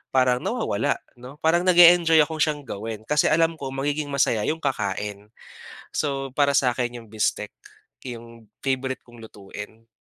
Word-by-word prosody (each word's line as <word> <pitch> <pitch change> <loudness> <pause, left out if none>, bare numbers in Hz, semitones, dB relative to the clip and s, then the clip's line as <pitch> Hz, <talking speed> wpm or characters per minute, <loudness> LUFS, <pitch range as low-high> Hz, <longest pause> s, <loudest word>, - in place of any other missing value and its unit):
parang 125 -1 +3
nawawala, - - -1 0.2
'no, 125 +3 -11
parang 170 +3 +2
nag-e-enjoy 170 -3 +7
akong 155 +1 -5
siyang 150 -1 0
gawin, 110 -2 -6
kasi 150 +5 +2
alam 165 0 +2
ko 140 - -5
magiging 145 +3 -2
masaya 130 -6 +1
'yong 160 +1 -2
kakain. 105 -5 -3 0.7
So, 135 -2 -1
para 140 -1 +3
sakin 125 -2 0
yung 115 - -16
bistek 105 -1 -1 0.6
yung 115 -2 -9 0.2
favorite 130 -1 -2
kong 120 -1 -17
lutuin. 105 +2 -11
130 Hz, 145 wpm, -24 LUFS, 115-150 Hz, 0.7 s, nag-e-enjoy